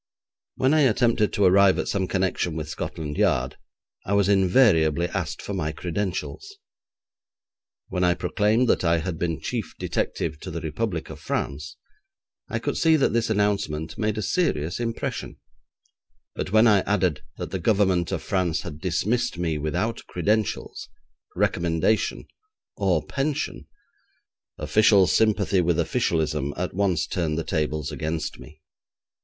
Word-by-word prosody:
When 130 +3 +2
I 155 - +4
attempted 115 -4 +3
to 100 - +2
arrive 95 +1 +5
at - - -2
some 95 -2 -1
connection 90 -3 -1
with 80 -1 -4
Scotland 75 -1 -5
Yard, 65 +1 +1 0.5
I 100 - -2
was 100 -1 +3
invariably 90 - +4
asked 90 -5 -4
for - - -5
my 75 0 -2
credentials. 95 - -4 1.3
When 90 -1 -2
I 90 -1 +3
proclaimed 105 +6 +1
that - - +2
I 85 -1 +3
had 80 0 -4
been 85 -3 -1
chief - - -4
detective 80 -2 -2
to - - -7
the 85 - -4
Republic 80 +1 -3
of - - -9
France, 75 +2 -4 0.7
I - - -1
could - - -2
see 160 -1 +4
that 140 - +2
this 115 -1 +1
announcement 100 -7 0
made 110 -1 -1
a 110 - -2
serious 95 - 0
impression, 115 -1 -4 1.0
but - - -4
when 110 +2 +5
I 105 -4 +6
added 95 -6 0 0.2
that - - -6
the 95 - -2
Government 95 -2 +2
of - - -3
France 90 -4 0
had 80 -6 -8
dismissed 100 +5 0
me 80 -3 -1
without 90 +10 -2
credentials, 105 +4 -1 0.5
recommendation, 85 +5 0 0.5
or 95 -6 +1
pension, 140 +1 -3 0.9
official 105 -3 +4
sympathy 100 0 +2
with 85 -1 +1
officialism 80 - 0
at 90 0 -3
once 95 -4 +1
turned 80 -4 -2
the 80 - -1
tables 75 -1 -2
against 80 +3 -3
me. 75 0 -14
90 Hz, 145 wpm, -24 LUFS, 80-105 Hz, 1.3 s, I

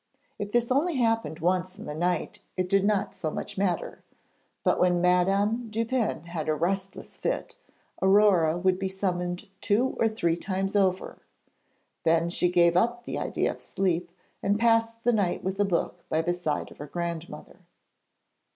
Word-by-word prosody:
If 205 0 -4
this 240 +1 +1
only 305 +5 +2
happened 225 - 0
once 185 +2 0
in - - -9
the 150 - -5
night 175 +2 -1 0.2
it 185 -1 0
did 195 +1 +3
not 205 -1 +1
so 155 - -3
much - - -5
matter; 185 -3 -2 0.6
but - - +2
when 180 -1 +3
Madame 195 +6 +2
Dupin 230 -4 -1
had 165 -2 -4
a 155 - +2
restless 190 +5 -3
fit, - - -3 0.4
Aurore 190 -5 +4
would 185 +1 +1
be 195 - -1
summoned 180 -2 -2
two 230 +6 +1
or 225 - +4
three 170 -7 0
times 195 +2 -3
over. 190 -2 +1 0.8
Then 165 +1 +2
she 175 0 +1
gave 170 -1 +4
up 235 +6 +2
the - - -3
idea - - 0
of - - -11
sleep, 180 -2 -1 0.3
and 200 +1 +1
passed 230 0 +2
the 240 - +3
night 200 -5 0
with 190 +1 -3
a 205 - +4
book 175 -1 -1
by 160 +1 +1
the 175 +1 +1
side 175 -4 -3
of - - -15
her 145 - -6
grandmother. 170 0 -6
185 Hz, 170 wpm, -27 LUFS, 175-210 Hz, 0.8 s, Aurore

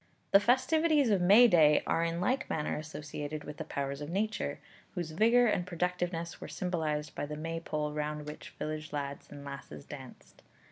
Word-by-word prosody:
The 195 - +8
festivities 285 +4 +3
of 195 -3 +3
May 205 +7 +8
day 155 -7 +5
are 165 - +1
in 170 0 -1
like 255 +9 0
manner 150 -1 -1
associated 150 -1 -5
with 150 0 -8
the - - -4
powers 140 0 -4
of 145 - -5
Nature, 215 +5 -1 0.4
whose 175 -3 -3
vigour 230 +8 +5
and 210 -5 +2
productiveness 175 -1 -2
were - - -6
symbolized 155 -5 -2
by 145 - -4
the 150 0 -5
Maypole 155 -1 -3
round 150 0 -3
which 150 0 -8
village 155 0 -4
lads 140 -1 -4
and 145 -1 -10
lasses 140 - -8
danced. - - -11
160 Hz, 175 wpm, -31 LUFS, 150-190 Hz, 0.4 s, The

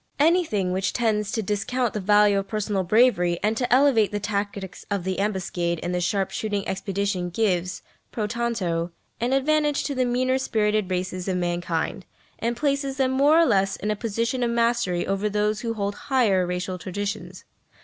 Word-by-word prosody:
Anything 295 - +2
which 190 +1 -1
tends 210 -3 0
to 220 - -1
discount 220 +4 -1
the 210 - -2
value 205 0 +4
of 195 - -5
personal 210 -2 -1
bravery 180 -3 +3
and 215 +1 +2
to 245 +2 -2
elevate 250 -5 +4
the 205 - -2
tactics 200 -2 -4
of 200 -3 -1
the 190 +1 -2
ambuscade 180 -4 -1
and 175 - -2
the 180 - 0
sharp 195 +2 0
shooting 205 -2 -2
expedition 190 -1 -2
gives, 185 -2 -1 0.3
pro 215 - -2
tanto, 210 -7 -1 0.3
an 240 +3 0
advantage 295 +2 +2
to 285 - -2
the 260 -1 +1
meaner 255 +2 +1
spirited 215 -5 0
races 185 0 -3
of 185 -1 0
mankind, 175 0 -2 0.3
and 235 +1 -1
places 275 -1 -1
them 265 -1 +2
more 285 +4 +4
or 335 - +6
less 195 -6 +2
in 210 - -2
a - - 0
position 230 +3 -2
of 240 - +1
mastery 235 -6 +1
over 195 +2 -1
those 210 +1 0
who 230 -1 -3
hold 200 -1 -2
higher 205 -7 +1
racial 180 +1 -3
traditions. 205 +4 -5
210 Hz, 180 wpm, -24 LUFS, 190-235 Hz, 0.3 s, or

